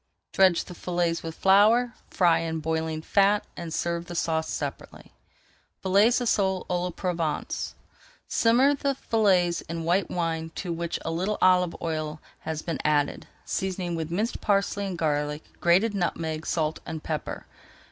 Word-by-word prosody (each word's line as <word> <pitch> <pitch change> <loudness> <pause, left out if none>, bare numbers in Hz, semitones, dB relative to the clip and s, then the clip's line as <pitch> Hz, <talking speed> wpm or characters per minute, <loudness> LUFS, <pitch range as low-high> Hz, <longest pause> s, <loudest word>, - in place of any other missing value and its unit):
Dredge 185 -3 +4
the 180 - -9
fillets 175 -1 -1
with 165 -1 -6
flour, 220 +5 +4 0.2
fry 175 -3 +3
in 160 -1 -2
boiling 160 0 -2
fat, 200 +3 +3
and 170 -1 -6
serve 170 +1 -2
the 175 - -7
sauce 160 -1 0
separately. - - -6 0.7
FILLETS 200 +6 +4
OF 245 - -1
SOLE 190 -3 +1
À 175 -1 +1
LA 180 - -1
PROVENCE 170 -4 -3 0.5
Simmer 250 +5 +4
the 280 -1 -1
fillets 190 -8 +2
in 165 0 -3
white 175 +2 +1
wine 165 -2 -2
to 175 -3 -3
which 170 0 -3
a 165 - -1
little 185 +6 -1
olive 180 -2 +4
oil 155 -1 -3 0.2
has 160 -1 -4
been 165 -3 -3
added, 145 -1 +1 0.2
seasoning 185 -2 -2
with 160 -1 -3
minced 210 +8 -2
parsley 200 0 +1
and 185 -2 -4
garlic, 150 -1 -1 0.2
grated 185 +6 +4
nutmeg, 160 -4 -2
salt, 160 -2 0
and 160 -2 -6
pepper. 155 -2 -4
175 Hz, 155 wpm, -26 LUFS, 160-195 Hz, 0.7 s, Dredge